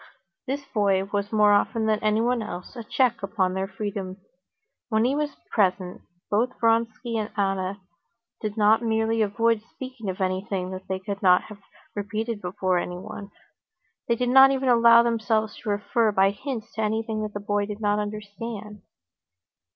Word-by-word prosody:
This 275 +2 -3
boy 200 -5 +1
was 200 +1 -3
more 210 -1 +5
often 220 +2 +1
than 215 -1 +2
anyone 225 +3 +2
else 180 +1 -7
a 235 - -6
check 240 +1 +1
upon 195 -2 0
their 190 +1 -2
freedom. 195 -1 -5 0.7
When 220 0 +2
he 265 +3 +1
was 295 -1 -2 0.2
present, 185 -3 0 0.3
both 235 +5 0
Vronsky 230 +1 +1
and 215 0 -3
Anna 195 0 -1 0.6
did 215 0 -4
not 215 +1 +4
merely 225 0 +1
avoid 220 +2 +2
speaking 255 -6 -6
of 185 - -4
anything 185 0 -2
that 185 0 -8
they 190 - -1
could 200 +1 -6
not 180 -2 +5
have 210 -1 -11 0.4
repeated 215 +1 -3
before 185 0 0
everyone; 195 +3 -6 0.8
they 235 - +2
did 245 +1 -1
not 265 +1 +8
even 265 -1 0
allow 235 -1 +7
themselves 220 -2 0
to 220 - -6
refer 210 +2 +1
by 195 -1 +3
hints 235 +1 -6
to 220 - -3
anything 220 0 -1
the 205 - -5
boy 205 0 -1
did 210 0 -6
not 205 -1 +1
understand. 210 0 -6
210 Hz, 160 wpm, -25 LUFS, 200-230 Hz, 0.8 s, not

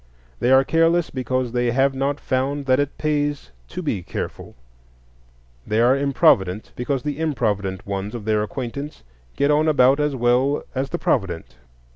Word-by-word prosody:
They 120 - +1
are 130 0 +6
careless 165 +3 +2
because 130 -1 -2
they 120 0 0
have 135 +3 +2
not 140 +2 -1
found 135 +2 -1
that 130 0 +3
it 145 0 -2
pays 145 -1 -1 0.2
to 180 +1 -6
be 115 - -2
careful; - - -6 1.1
they 110 +1 +1
are 120 +3 +5
improvident 135 - +2
because 130 +1 -2
the 150 0 -3
improvident 105 - -1
ones 100 +2 -4
of 110 -4 -7
their 110 -1 +1
acquaintance 130 - -5 0.3
get 140 +1 +2
on 150 +2 +3
about 140 -2 +4
as 150 -1 0
well 125 +3 +2
as 135 +1 -2
the 175 - -2
provident. 90 - -1
130 Hz, 160 wpm, -22 LUFS, 115-145 Hz, 1.1 s, are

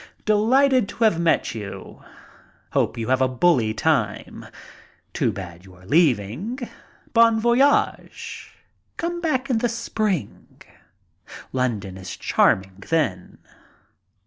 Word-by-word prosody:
"Delighted 245 +3 +3
to 230 - -3
have 210 -7 +3
met 170 -7 +1
you. 105 -3 -8 0.7
Hope - - 0
you 115 0 -4
have 130 0 +2
a 130 - +4
bully 130 -3 +2
time. 110 -3 -1 0.7
Too - - +1
bad 90 -3 -9
you 95 -1 -16
are 90 0 -18
leaving. 145 - +1 0.6
Bon 230 -1 +5
voyage. 240 +5 0 0.5
Come 345 +1 -3
back 275 -6 0
in 230 - +2
the 240 +1 0
spring. 215 - -3 0.9
London 110 -8 -2
is 95 -1 -8
charming 95 +1 +1
then. 120 - -1
160 Hz, 115 wpm, -23 LUFS, -, 0.9 s, Bon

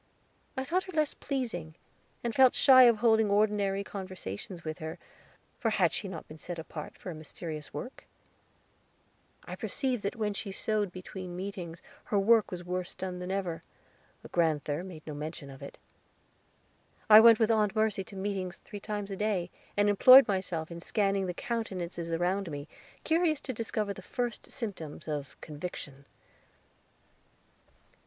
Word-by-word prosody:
I 265 - 0
thought 355 +7 0
her 375 - -8
less 305 -2 +1
pleasing, 240 - -4 0.5
and 235 -1 -1
felt 260 +1 +6
shy 255 -2 +8
of 235 -2 +6
holding 220 -1 +4
ordinary 200 -1 +2
conversations 185 - -7
with 155 +1 -5
her, 160 -1 -5 0.6
for 225 - +1
had 185 -6 +2
she 200 - -1
not 175 -4 -7
been 155 +1 -11
set 175 +3 -5
apart 160 -1 -7
for 185 - -7
a - - -5
mysterious 155 -1 -7
work? 255 - -7 1.4
I - - -6
perceived 255 -5 -1
that 200 +4 -2
when 210 -3 -1
she 200 0 -5
sewed 210 0 -1
between 185 0 -7
meetings 180 -3 -6 0.2
her 205 - 0
work 215 +2 +4
was 175 -1 -6
worse 180 0 -4
done 185 -1 -5
than 180 0 -5
ever; 190 -4 -2 0.6
but - - -12
grand'ther 155 -2 +1
made 175 -5 -10
no 155 - -5
mention 150 -1 -6
of 135 - -12
it. 140 - -9 1.3
I 215 -1 +11
went 230 0 +8
with 225 0 +3
Aunt 215 -2 +2
Mercy 215 -3 +1
to 200 - -12
meetings 190 -2 -3
three 205 - -9
times 205 -1 -4
a - - -2
day, 190 -4 -1 0.3
and 205 0 +4
employed 255 +6 +9
myself 180 -5 -2
in 170 - -6
scanning 195 +1 0
the 180 - -3
countenances 185 -8 -3
around 180 +3 0
me, 145 0 -6 0.4
curious 320 -2 +2
to 260 - -4
discover 215 -2 -2
the 190 - -10
first 240 +4 -4
symptoms 180 - -6
of 145 -3 -4
Conviction. 145 -3 -7
195 Hz, 160 wpm, -30 LUFS, 170-220 Hz, 1.4 s, I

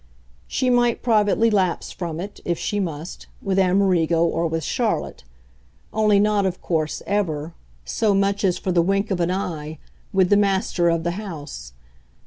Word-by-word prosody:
She 255 -1 0
might 240 -1 +2
privately 225 -1 +3
lapse 190 -4 0
from 170 -3 -5
it, 200 +3 -7
if 170 -1 -1
she 205 - -2
must, 165 -3 -5
with 195 -1 0
Amerigo 180 -3 +3
or 165 0 0
with 165 0 -2
Charlotte - - -2 0.7
only 215 -2 +3
not, 210 0 +2
of 185 -1 -1
course, 155 -3 -2
ever, 165 -6 -1 0.3
so 205 - +1
much 200 +1 +1
as 185 -3 +2
for 185 - -2
the 175 -1 +4
wink 195 +4 0
of 185 - 0
an 170 0 +1
eye, 160 -5 -3 0.3
with 190 -1 +2
the 205 - +6
master 190 -3 +2
of 165 -1 0
the 170 - 0
house. 145 - -8
185 Hz, 165 wpm, -22 LUFS, 165-205 Hz, 0.7 s, the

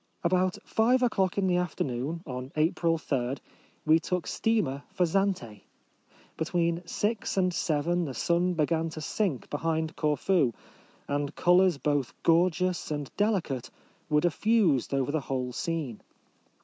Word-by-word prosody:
About 185 +1 +2
five 250 +3 +2
o'clock 195 -7 +1
in 200 - +2
the 180 -1 +2
after 180 -1 -1
noon, 140 +7 -3
on 125 -1 -6
April 165 +1 +2
3, 135 -4 -1 0.5
we 160 +1 +5
took 180 +1 -2
steamer 185 -12 0
for 185 -3 +2
Zante. 175 - -1 0.8
Between 170 +1 0
six 210 +3 -1
and 185 -1 +2
seven 170 +2 0
the 135 -4 -5
sun 175 +6 +1
began 165 +1 +1
to 160 - -7
sink 160 - -1
behind 160 +1 -1
Corfu, 150 -3 +2 0.5
and 145 +1 -2
colours 180 -2 +4
both 145 -3 -1
gorgeous 180 +1 +2
and 145 -2 -4
deli 205 -1 +2
cate 130 -5 -5 0.4
were 150 -1 +3
diffused 175 - +2
over 135 0 0
the 155 0 0
whole 130 -2 -3
scene. 150 -7 -3
165 Hz, 140 wpm, -28 LUFS, 145-180 Hz, 0.8 s, we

